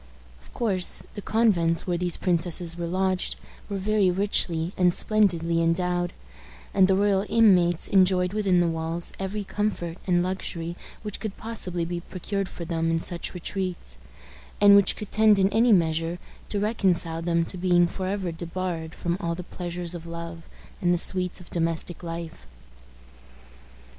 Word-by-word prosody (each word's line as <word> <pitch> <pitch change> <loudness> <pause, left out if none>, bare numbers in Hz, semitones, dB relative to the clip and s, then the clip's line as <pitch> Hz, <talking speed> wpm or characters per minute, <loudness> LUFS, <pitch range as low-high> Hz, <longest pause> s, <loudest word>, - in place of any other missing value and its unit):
Of - - -19
course, 190 -6 -1
the 205 - -7
convents 185 -8 +2
where 180 - -1
these 175 0 -1
princesses 175 -1 +1
were 170 -1 -4
lodged 185 +1 -1 0.3
were 200 - -2
very 200 0 +2
richly 180 -3 +1
and 180 -1 +3
splendidly 170 -5 +2
endowed, 175 +1 0 0.6
and 190 -1 +5
the 190 - +3
royal 200 0 +2
inmates 180 -7 +4
enjoyed 185 -1 +3
within 195 -4 +2
the 175 - +2
walls 165 +1 -2
every 195 +2 -3
comfort 190 -4 -3
and 175 -1 +3
luxury 175 -2 -4 0.3
which 210 -2 -5
could 215 -3 -5
possibly 185 -7 -3
be 175 +1 -4
procured 195 +2 -4
for 170 - -8
them 165 0 -1
in 165 0 +1
such 175 +2 -4
retreats, 180 - -4 0.6
and 205 0 +8
which 200 -1 +4
could 210 - -7
tend 215 -1 +5
in 195 0 +3
any 230 +3 +3
measure 165 -2 +2 0.3
to 205 - -1
reconcile 185 -6 +1
them 170 0 +1
to 185 - -4
being 175 -1 +3
forever 185 +1 -3
debarred 170 -1 -5
from 175 0 -2
all 170 -3 -2
the 180 - -7
pleasures 175 -1 -3
of 170 -1 -8
love 170 0 -8 0.3
and 175 - +2
the 175 - +3
sweets 180 +1 +4
of 180 - -15
domestic 165 0 -2
life. 165 -1 -7
180 Hz, 160 wpm, -25 LUFS, 170-195 Hz, 0.6 s, and